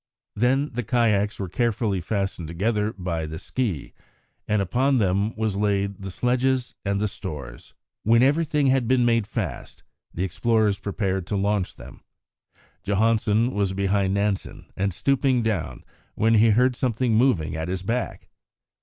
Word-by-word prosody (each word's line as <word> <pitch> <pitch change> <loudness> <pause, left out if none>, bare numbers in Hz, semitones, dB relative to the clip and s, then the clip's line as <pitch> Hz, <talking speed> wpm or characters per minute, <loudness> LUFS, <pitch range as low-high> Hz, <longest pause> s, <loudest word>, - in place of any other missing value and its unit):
Then 130 +6 +1
the 125 - -1
kayaks 105 -3 +1
were 95 - -4
carefully 105 -1 0
fastened 95 -3 -2
together 105 +5 0
by 85 -5 -3
the 80 +1 -6
ski, 100 - -3 0.5
and 105 0 +2
upon 130 +9 +1
them 100 +1 +1
was 110 -3 -1
laid 100 -1 0
the 95 - -5
sledges 125 +4 0
and 100 0 0
the 105 - +1
stores. 75 -12 -8 0.3
When 115 +3 +4
everything 150 +1 +2
had 130 -3 +2
been 125 -1 +3
made 115 -3 +2
fast, - - -5 0.3
the 90 - -3
explorers 105 +2 +1
prepared 95 -3 -2
to 105 - -2
launch 100 -1 0
them. - - -13 0.8
Johansen 110 +3 +2
was 100 -2 0
behind 100 0 +1
Nansen, 100 -1 -2
and 100 +1 0
stooping 130 - +1
down, 105 -9 -2 0.3
when 115 +1 +2
he 115 +1 +5
heard 125 +4 +3
something 120 -1 0
moving 110 - +2
at 80 +1 -3
his 95 0 -3
back. 120 +4 -3
105 Hz, 150 wpm, -24 LUFS, 95-120 Hz, 0.8 s, he